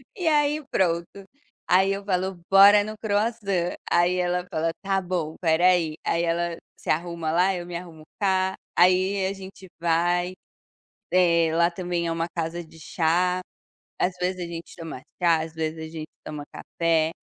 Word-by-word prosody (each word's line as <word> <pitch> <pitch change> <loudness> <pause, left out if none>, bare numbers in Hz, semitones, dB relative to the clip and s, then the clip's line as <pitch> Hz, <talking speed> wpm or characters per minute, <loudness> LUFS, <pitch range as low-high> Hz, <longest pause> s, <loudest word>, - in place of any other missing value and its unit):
E 360 -5 -2
aí 300 0 +2
pronto, 170 -2 +1 0.6
aí 190 +2 +4
eu 200 0 -3
falo: 185 -1 -1
"Bora 200 +1 +8
no 215 +1 -6
croissant", 205 -4 0
aí 175 +1 +3
ela 180 0 0
fala: 165 0 0
"Tá 195 -1 +1
bom, 175 -4 -2
espera 165 +1 +1
aí". 165 -4 +2
Aí 170 +1 +1
ela 170 0 0 0.2
se - - -9
arruma 170 -1 -2
lá, 180 +3 +3
eu 175 -1 -5
me 175 -1 -7
arrumo 170 -3 -8 0.2
cá, 190 -1 +1 0.2
aí 185 +2 +3
a 195 - -1
gente 190 0 -11
vai, 175 +2 +1 0.8
eh, 170 -3 +4
lá 170 +1 +4
também 175 -1 -3
é - - -1
uma 165 +1 -1
casa 170 +1 -3
de 160 0 -17
chá, 180 +3 +1 0.6
às 180 - +1
vezes 180 0 -1
a - - -2
gente 170 0 -8
toma 165 -6 -8 0.2
chá, 165 -2 +4
às 160 0 -6
vezes 160 0 -3
a - - -7
gente 160 -1 -7 0.2
toma 150 -1 -6
café. 165 -1 0
175 Hz, 170 wpm, -25 LUFS, 165-190 Hz, 0.8 s, Bora